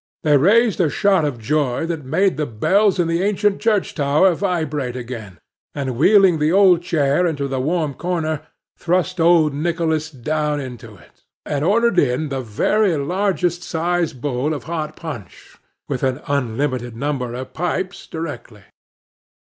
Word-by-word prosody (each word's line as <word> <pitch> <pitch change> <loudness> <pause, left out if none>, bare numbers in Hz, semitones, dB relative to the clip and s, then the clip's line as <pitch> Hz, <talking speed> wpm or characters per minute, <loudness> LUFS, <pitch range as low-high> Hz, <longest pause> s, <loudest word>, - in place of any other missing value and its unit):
They 150 -2 +4
raised 205 - +4
a 165 - +2
shout 190 -1 +2
of 140 -5 -2
joy, 135 +3 -1
that 165 -3 -4
made 185 +8 +1
the 150 0 -2
bells 195 - +2
in 175 -2 +1
the 165 +1 0
ancient 205 0 +1
church 210 -3 +1
tower 150 +5 +3
vibrate 155 -9 -2
again, 115 -7 -7 0.4
and 135 -3 -3
wheeling 185 - +5
the 150 +1 +2
old 185 -2 +5
chair 160 0 +1
into 145 -4 -2
the 135 -1 -2
warm 155 +1 -1
corner, 160 -2 -2 0.4
thrust 180 +1 0
old 165 -3 +4
Nicholas 160 0 -1
down 150 +2 -2
into 120 -5 -8
it, - - -21 0.2
and 145 -1 -2
ordered 210 +2 +3
in 140 +2 0
the 135 -1 -3
very 170 - +1
largest 175 +2 -1
sized 170 -4 -1
bowl 145 +2 -1
of 145 - -7
hot 155 -2 -4
punch, 150 - -9 0.3
with - - -3
an 130 +1 0
unlimited 125 -2 -2
number 125 -2 -3
of 130 +1 -7
pipes, 180 +3 -3
directly. 145 -10 -7
155 Hz, 155 wpm, -20 LUFS, 135-180 Hz, 0.4 s, wheeling